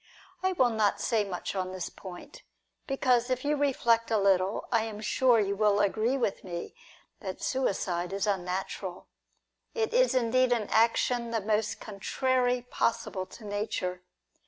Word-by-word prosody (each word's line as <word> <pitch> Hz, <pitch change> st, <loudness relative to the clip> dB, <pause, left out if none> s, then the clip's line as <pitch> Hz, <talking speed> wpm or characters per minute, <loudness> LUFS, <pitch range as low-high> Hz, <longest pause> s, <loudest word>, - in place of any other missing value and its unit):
I 375 Hz, 0 st, +1 dB
will 255 Hz, -8 st, +3 dB
not 215 Hz, -2 st, +1 dB
say 225 Hz, -3 st, +1 dB
much 185 Hz, -3 st, -4 dB
on 185 Hz, -1 st, -2 dB
this 185 Hz, -2 st, -4 dB
point, 190 Hz, -, -11 dB, 0.5 s
because 255 Hz, -3 st, +2 dB
if 255 Hz, +1 st, -1 dB
you 295 Hz, +1 st, +2 dB
reflect 235 Hz, -5 st, +2 dB
a 225 Hz, -, +2 dB
little, 195 Hz, 0 st, +2 dB
I 230 Hz, -2 st, +3 dB
am 215 Hz, -2 st, -6 dB
sure 240 Hz, +2 st, +3 dB
you 200 Hz, -1 st, 0 dB
will 205 Hz, 0 st, +3 dB
agree 220 Hz, +6 st, +1 dB
with 225 Hz, -6 st, -1 dB
me 175 Hz, -2 st, -6 dB, 0.5 s
that 190 Hz, -2 st, -6 dB
suicide 185 Hz, -8 st, -1 dB
is 195 Hz, +1 st, -1 dB
unnatural. 185 Hz, -1 st, -3 dB, 0.7 s
It 450 Hz, 0 st, 0 dB
is -, -, +4 dB
indeed 255 Hz, +1 st, +3 dB
an 220 Hz, -4 st, -2 dB
action 235 Hz, +1 st, +2 dB
the 230 Hz, -1 st, 0 dB
most 215 Hz, +1 st, 0 dB
contrary 245 Hz, +4 st, 0 dB
possible 215 Hz, -6 st, -1 dB
to 215 Hz, +3 st, -12 dB
nature. 205 Hz, -3 st, -3 dB
220 Hz, 155 wpm, -29 LUFS, 195-250 Hz, 0.7 s, is